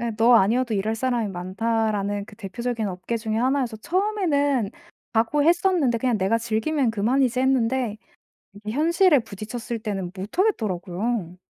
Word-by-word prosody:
예 235 0 -1
'너 230 +3 +5
아니어도 230 +3 +3
일할 215 +2 0
사람이 240 -2 -1
많다.'라는 205 +2 -1
그 210 - -14
대표적인 230 +2 -3
업계 185 +5 -4
중의 220 0 -2
하나여서 255 -2 0
처음에는 290 - 0 0.4
각오했었는데 295 +3 +2
'그냥 245 -1 +1
내가 200 +3 +1
즐기면 235 +4 0
그만이지.' 245 +4 +1
했는데 255 -3 +1 0.6
이게 210 +1 -6
현실에 330 - +4
부딪혔을 225 +2 -6
때는 195 -5 -4
못 190 - -7
하겠더라고요. 200 - -1
230 Hz, 365 characters per minute, -24 LUFS, 210-260 Hz, 0.6 s, 너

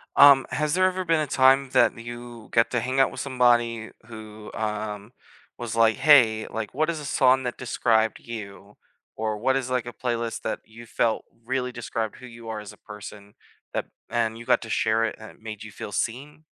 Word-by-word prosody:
Um, 140 -2 +8
has 150 0 0
there 185 +1 +3
ever 185 0 -2
been 165 -2 +2
a 150 - -2
time 135 0 +4
that - - +3
you 120 0 -9
get 115 0 +3
to 120 -2 0
hang 130 +2 -1
out 135 - +4
with - - -6
somebody 120 -4 +2 0.2
who, 110 -1 -10
um, 105 0 -4 0.4
was 120 -1 -5
like, 115 -1 +4
"hey, 115 -8 +5
like 110 -2 -4
what 155 +4 +1
is 160 -2 -2
a 145 - -7
song 130 -2 +3
that 125 - -4
described 115 -2 +1
you, 105 -3 -9 0.4
or 110 -1 -2
what 130 +5 +1
is 130 -2 -1
like 125 -2 0
a 120 - -7
playlist 115 -1 -3
that - - -3
you 115 +2 -13
felt 115 0 0 0.2
really 125 0 -1
described 115 -2 -4
who 130 - -12
you 115 -2 -10
are 110 -1 -4
as 105 - -9
a - - -18
person," 105 -1 -11 0.4
that - - -1 0.2
and 115 -1 0
you 115 - -10
got - - +3
to 115 - -9
share 110 +1 +2
it - - -3
and 110 - -10
it - - -23
made 110 -1 -7
you 110 - -10
feel 100 - -8
seen? 145 +9 -3
115 Hz, 210 wpm, -25 LUFS, 110-130 Hz, 0.4 s, Um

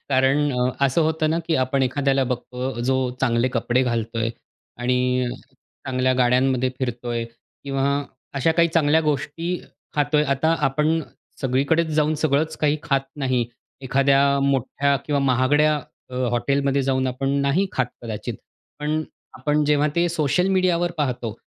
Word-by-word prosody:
कारण 135 +2 +3
अ, 125 0 +1 0.2
असं 135 +5 +1
होतं 160 0 +1
ना 165 - +1
की 165 - +1
आपण 130 +1 +1
एखाद्याला 135 +1 +1
बघतो, 125 0 -4
जो 130 +2 +1 0.2
चांगले 120 -1 +2
कपडे 125 +1 +1
घालतोय 115 -2 -1 0.5
आणि 125 0 +1 0.6
चांगल्या 130 0 +1
गाड्यांमध्ये 130 +1 +2
फिरतोय, 120 -2 -3 0.4
किंवा 140 0 0 0.4
अशा 140 +4 +2
काही 170 +1 +3
चांगल्या 160 -1 +3
गोष्टी 160 +4 -2 0.4
खातोय. 150 0 +2
आता 140 +4 +1
आपण 150 +4 +1 0.4
सगळीकडेच 140 +6 +1
जाऊन 155 0 +2
सगळंच 155 +1 0
काही 150 0 +2
खात 140 -4 +1 0.2
नाही. 130 -4 0 0.4
एखाद्या 135 +1 +3 0.2
मोठ्या 140 +1 +1
किंवा 145 -2 +1
महागड्या 140 +4 +3 0.4
अ, - - -8 0.2
हॉटेलमध्ये 140 +3 +1
जाऊन 130 0 +1
आपण 130 +2 -2
नाही 140 +8 +2
खात 130 - 0 0.2
कदाचित. 110 -3 -5 0.4
पण 150 +1 -1 0.4
आपण 150 0 +1
जेव्हा 150 0 +3
ते 175 0 +3
सोशल 170 +2 +1
मीडियावर 180 -2 +2
पाहतो, 125 -6 -1
135 Hz, 135 wpm, -23 LUFS, 125-150 Hz, 0.6 s, कारण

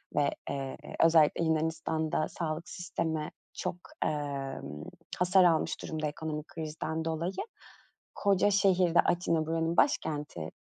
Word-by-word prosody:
ve, 140 - +3 0.2
eee, 135 -1 -3 0.3
özellikle 165 0 +5
Yunanistan'da 160 0 0
sağlık 160 -1 -4
sistemi 160 -3 -3 0.2
çok, - - -3 0.3
emm, 135 - -3 0.4
hasar 180 +1 +5
almış 170 -3 +2
durumda 155 -1 -2
ekonomik 155 0 -4
krizden 160 0 -4
dolayı. 165 +3 -1 0.8
Koca 200 0 +3
şehirde, 185 -4 +4
Atina 170 -3 +1
buranın 165 +1 0
başkenti, 145 - +1
160 Hz, 105 wpm, -30 LUFS, 150-170 Hz, 0.8 s, özellikle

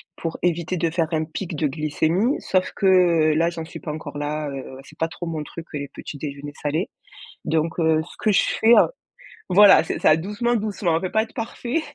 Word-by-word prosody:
pour 165 -1 -4
éviter 175 0 0
de 165 0 +1
faire 165 -1 0
un 155 0 +1
pic 165 +1 -5
de 150 0 +1
glycémie, 160 - 0
sauf 185 -1 0
que 175 -5 +4
là 165 +2 +2
j'en 165 -1 -6
suis - - -9
pas 150 - -5
encore 150 -2 -7
là, 150 0 -3
heu, 135 -1 -6 0.2
c'est 155 +2 -17
pas 165 - 0
trop 170 +2 -7
mon 160 -2 -3
truc, 165 +2 -9
heu, - - -2
les 140 - -5
petits 145 - -9
déjeuners 145 0 -6
salés. 155 +5 -1 0.6
Donc, 165 +2 -1
heu, 160 -1 +3
ce 170 - -14
que 215 - +1
je 195 - +4 0.2
fais, 225 +1 +6
heu - - +6 0.6
voilà 200 0 +7
c'est - - -4
ça 155 - +5
doucement, 210 +7 -1
doucement, 200 -6 0
on 165 - 0
peut 185 - -3
pas 220 0 +2
être 225 - -13
parfait. 240 +5 -3
165 Hz, 220 wpm, -23 LUFS, 155-185 Hz, 0.6 s, voilà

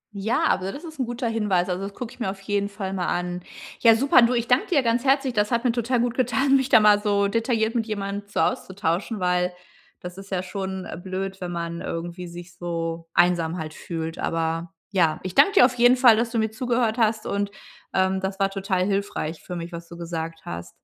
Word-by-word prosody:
Ja, 200 +3 0
also, 190 +1 0
das 290 - -9
ist 315 -4 -10
'n 255 - +1
guter 240 +1 -3
Hinweis, 210 -6 +1
also, 180 +1 -2
das 200 +1 -5
gucke 240 -2 -6
ich - - -19
mir 225 - -1
auf 195 0 -6
jeden 200 0 -1
Fall 200 -2 -5
mal 185 -2 -2
an. 180 0 -2 0.4
Ja, 230 -2 +7
super, 265 +2 +5
du, 235 +1 +4
ich 235 0 -1
danke 250 +1 +3
dir 290 -7 +2
ganz 235 +1 +1
herzlich, 270 -1 +2
das 210 -2 +1
hat 235 0 +1
mir 250 - +3
total 240 +1 0
gut 240 -1 0
getan, 270 +2 +2
mich 265 -1 +2
da - - +7
mal 210 -1 +5
so 200 -1 +2
detailliert 225 +1 0
mit 230 -2 -1
jemandem 200 -1 -4
so 205 - -3
auszutauschen, 200 -2 -1
weil 180 0 +1 0.5
das 180 +1 -8
ist 195 0 -11
ja 185 -2 -1
schon, 190 0 -5
äh, - - -7
blöd, 190 +1 -5
wenn 180 -1 -4
man 170 0 -4
irgendwie 175 +2 -5
sich 175 +1 -10
so 165 -1 -4
einsam 175 -1 +3
halt 155 -2 -5
fühlt. 165 -1 -5
Aber 165 +1 -2 0.2
ja. 165 -6 +2
Ich 185 - -5
danke 290 - +5
dir 390 - +8
auf 250 - +1
jeden 245 +1 +6
Fall, 245 -3 +7
dass 230 +2 0
du 230 - -3
mir 220 -1 +1
zugehört 235 0 0
hast 220 -1 +1
und, 200 0 -1 0.5
ähm, 190 0 +2
das 190 +1 -4
war 195 0 +2
total 195 -2 -1
hilfreich 195 -5 -2
für 180 - -7
mich, 170 0 -6
was 170 0 -8
du 170 - -10
gesagt 165 -1 -5
hast. 85 0 -6
195 Hz, 230 wpm, -24 LUFS, 175-230 Hz, 0.5 s, dir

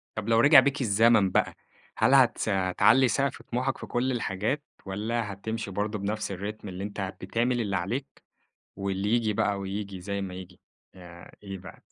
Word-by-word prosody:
طب 110 0 -4
لو 115 0 +4
رجع 145 +2 +9
بيك 140 +2 -1
الزمن 110 -3 +4
بقى، - - +1 0.4
هل 135 - +4
هتس 125 -4 +4 0.3
تعلي 130 -1 +6
سقف 135 +2 -1
طموحك 130 +2 -2
في - - -8
كلّ 130 +2 0
الحاجات، 115 +4 -2 0.2
والّا 105 +2 -2
هتمشي 100 +1 -5
برضه 105 +2 -2
بنفْس 105 +1 -3
الRhythm 100 +3 -6
اللي 95 -1 -6
أنت 100 -2 -4
بتعمل 120 +1 0
اللي 100 -4 -1
عليك، 120 +10 -4 0.5
واللي 100 +1 -2
ييجي 115 -2 +2
بقى 100 -1 0
وييجي 100 -1 -5
زي 100 +1 -3
ما 95 -2 -5
ييجي، 90 -1 -10 0.3
يع 85 -2 -13
إيه 95 -1 -6
بقى؟ 90 - -13
105 Hz, 170 wpm, -27 LUFS, 95-120 Hz, 0.5 s, رجع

